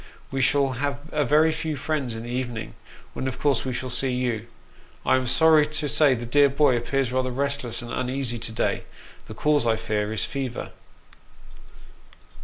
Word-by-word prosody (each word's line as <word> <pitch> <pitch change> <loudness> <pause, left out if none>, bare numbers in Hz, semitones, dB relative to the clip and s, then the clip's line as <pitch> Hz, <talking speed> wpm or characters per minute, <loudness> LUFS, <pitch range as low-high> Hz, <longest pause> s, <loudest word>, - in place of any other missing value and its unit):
We 135 0 -1
shall 135 +2 +3
have 145 -1 -1
a 150 -1 +1
very 150 +4 +4
few 155 -1 -3
friends 135 -3 -2
in 115 - -6
the 120 - -6
evening, 120 -3 -4 0.4
when 130 - -3
of 130 - -4
course 140 -4 +1
we 130 - -3
shall 125 +1 -4
see 135 +2 0
you. 120 -3 -2 0.6
I - - +4
am 130 -1 0
sorry 155 +3 +5
to 155 0 -2
say 145 -1 +4
that - - -6
the 120 - -5
dear 140 +4 +4
boy 140 -1 +3
appears 120 +2 -1
rather 130 0 0
restless 135 -2 -2
and 120 - -7
uneasy 125 -2 -1
to 115 - -2
day: 110 - -1 0.4
the - - -8
cause, 150 -5 +2
I 115 - +3
fear, 105 -1 -2
is 110 -4 -1
fever. 135 -3 -4
130 Hz, 190 wpm, -25 LUFS, 120-145 Hz, 0.6 s, sorry